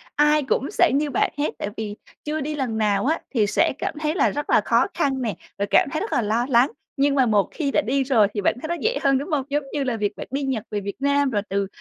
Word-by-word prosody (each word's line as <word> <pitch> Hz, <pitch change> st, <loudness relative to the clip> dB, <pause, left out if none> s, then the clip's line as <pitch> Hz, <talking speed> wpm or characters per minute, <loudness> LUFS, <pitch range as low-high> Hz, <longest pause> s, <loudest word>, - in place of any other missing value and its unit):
ai 300 Hz, 0 st, +4 dB
cũng 265 Hz, +1 st, -1 dB
sẽ -, -, +3 dB
như 295 Hz, +1 st, +1 dB
bạn -, -, +1 dB
hết, 290 Hz, -, 0 dB
tại -, -, -3 dB
vì, 210 Hz, -1 st, -4 dB, 0.3 s
chưa 305 Hz, 0 st, -2 dB
đi 300 Hz, +2 st, -3 dB
lần 250 Hz, -6 st, -2 dB
nào 210 Hz, 0 st, +1 dB
á, 320 Hz, +3 st, +1 dB
thì 215 Hz, -5 st, +2 dB
sẽ -, -, +2 dB
cảm -, -, -2 dB
thấy 310 Hz, +1 st, -1 dB
là -, -, +3 dB
rất 290 Hz, +1 st, -4 dB
là -, -, +5 dB
khó -, -, +2 dB
khăn 270 Hz, -5 st, 0 dB
nè, 220 Hz, -8 st, -2 dB, 0.2 s
rồi 200 Hz, 0 st, -1 dB
cảm -, -, +4 dB
thấy 310 Hz, -, -1 dB
rất 425 Hz, -, -4 dB
là -, -, +2 dB
lo 225 Hz, +3 st, 0 dB
lắng. 250 Hz, +2 st, +4 dB, 0.3 s
Nhưng 280 Hz, 0 st, +2 dB
mà 265 Hz, -2 st, +4 dB
một 210 Hz, -4 st, +2 dB
khi 285 Hz, -4 st, -2 dB
đã -, -, +3 dB
đi 270 Hz, +4 st, 0 dB
rồi 235 Hz, -6 st, +4 dB
thì 205 Hz, -, -2 dB
bạn 195 Hz, -, +2 dB
thấy 315 Hz, -, -4 dB
nó 345 Hz, -, -1 dB
dễ 475 Hz, +3 st, +1 dB
hơn, 275 Hz, -1 st, +4 dB
đúng 285 Hz, +6 st, -4 dB
hông? 280 Hz, -3 st, +1 dB
Giống 290 Hz, +1 st, 0 dB
như 290 Hz, -, 0 dB
là 245 Hz, -4 st, -1 dB
việc 205 Hz, -1 st, -1 dB
bạn -, -, -7 dB
đi 275 Hz, +1 st, -2 dB
Nhật 260 Hz, -6 st, -2 dB
về 205 Hz, -1 st, -2 dB
Việt 200 Hz, 0 st, -5 dB
Nam 280 Hz, 0 st, +2 dB
rồi 205 Hz, -4 st, 0 dB
từ 195 Hz, 0 st, 0 dB
270 Hz, 290 wpm, -23 LUFS, 215-290 Hz, 0.3 s, là